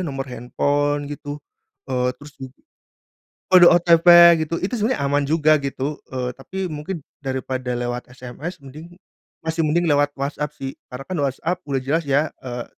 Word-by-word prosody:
nomor 135 Hz, -2 st, -4 dB
handphone 145 Hz, +4 st, -1 dB
gitu, 145 Hz, 0 st, -6 dB, 0.5 s
eee, 125 Hz, 0 st, +1 dB
terus 145 Hz, +2 st, -13 dB
ju 130 Hz, -, -6 dB, 1.1 s
kode 175 Hz, -1 st, +9 dB
OTP 170 Hz, -1 st, +7 dB
gitu, 165 Hz, +2 st, -3 dB
itu 200 Hz, +7 st, -2 dB
sebenarnya 230 Hz, -, 0 dB
aman 145 Hz, +1 st, +1 dB
juga 155 Hz, +1 st, +3 dB
gitu, 140 Hz, +2 st, -3 dB, 0.2 s
eee, 125 Hz, -1 st, -3 dB
tapi 190 Hz, +8 st, -5 dB
mungkin 155 Hz, +3 st, -5 dB, 0.2 s
daripada 130 Hz, -1 st, -3 dB
lewat 120 Hz, 0 st, -4 dB
SMS, 125 Hz, +8 st, -8 dB
mending 155 Hz, +6 st, -13 dB, 0.4 s
masih 160 Hz, 0 st, -2 dB
mending 170 Hz, +3 st, +1 dB
lewat 145 Hz, -2 st, +3 dB
WhatsApp 145 Hz, +1 st, -3 dB
sih, 135 Hz, -2 st, -7 dB, 0.2 s
karena 125 Hz, +2 st, -7 dB
kan 185 Hz, -, -5 dB
WhatsApp 150 Hz, +6 st, -1 dB
udah 140 Hz, -2 st, -2 dB
jelas 145 Hz, +6 st, 0 dB
ya, 140 Hz, +2 st, +2 dB, 0.2 s
eee, 120 Hz, -2 st, -6 dB
145 Hz, 155 wpm, -21 LUFS, 135-165 Hz, 1.1 s, kode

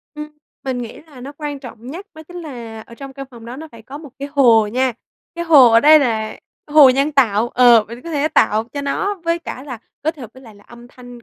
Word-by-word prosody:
Ừm. 300 Hz, 0 st, -7 dB, 0.4 s
Mình 260 Hz, -2 st, -3 dB
nghĩ 235 Hz, -2 st, -8 dB
là 275 Hz, -5 st, -15 dB
nó 275 Hz, +3 st, -9 dB
quan 295 Hz, -2 st, -5 dB
trọng 240 Hz, -3 st, -12 dB
nhất 345 Hz, +10 st, -8 dB
đó 315 Hz, -, -11 dB
chính 355 Hz, -, -11 dB
là 235 Hz, -7 st, -9 dB
ở 235 Hz, -, -13 dB
trong 275 Hz, +2 st, -10 dB
căn 275 Hz, 0 st, -9 dB
phòng 235 Hz, -3 st, -14 dB
đó 240 Hz, +2 st, -8 dB
nó 320 Hz, +2 st, -10 dB
phải 230 Hz, -1 st, -14 dB
có 275 Hz, +6 st, -10 dB
một 300 Hz, -4 st, -12 dB
cái 280 Hz, +1 st, -6 dB
hồ 235 Hz, -7 st, +4 dB
nha. 255 Hz, +3 st, -1 dB, 0.4 s
Cái 340 Hz, -, -4 dB
hồ 280 Hz, -8 st, +7 dB
ở 230 Hz, -, +5 dB
đây 305 Hz, +4 st, +7 dB
là 220 Hz, -5 st, -2 dB, 0.3 s
hồ 295 Hz, -3 st, +7 dB
nhân 275 Hz, +4 st, 0 dB
tạo 235 Hz, -5 st, +2 dB
ờ, 240 Hz, -3 st, +5 dB
mình 240 Hz, +2 st, -10 dB
có 335 Hz, -, -8 dB
thể 300 Hz, 0 st, 0 dB
tạo 220 Hz, -4 st, +2 dB
cho 285 Hz, -, -4 dB
nó 390 Hz, +9 st, -2 dB
với 335 Hz, 0 st, 0 dB
cả 260 Hz, -6 st, -8 dB
là 255 Hz, -5 st, -8 dB, 0.2 s
kết 315 Hz, +1 st, -2 dB
hợp 245 Hz, -6 st, -10 dB
với 260 Hz, -, -15 dB
lại 225 Hz, -3 st, -15 dB
là 205 Hz, 0 st, -20 dB
âm 240 Hz, 0 st, -15 dB
thanh 245 Hz, -2 st, -14 dB
260 Hz, 255 wpm, -18 LUFS, 235-295 Hz, 0.4 s, hồ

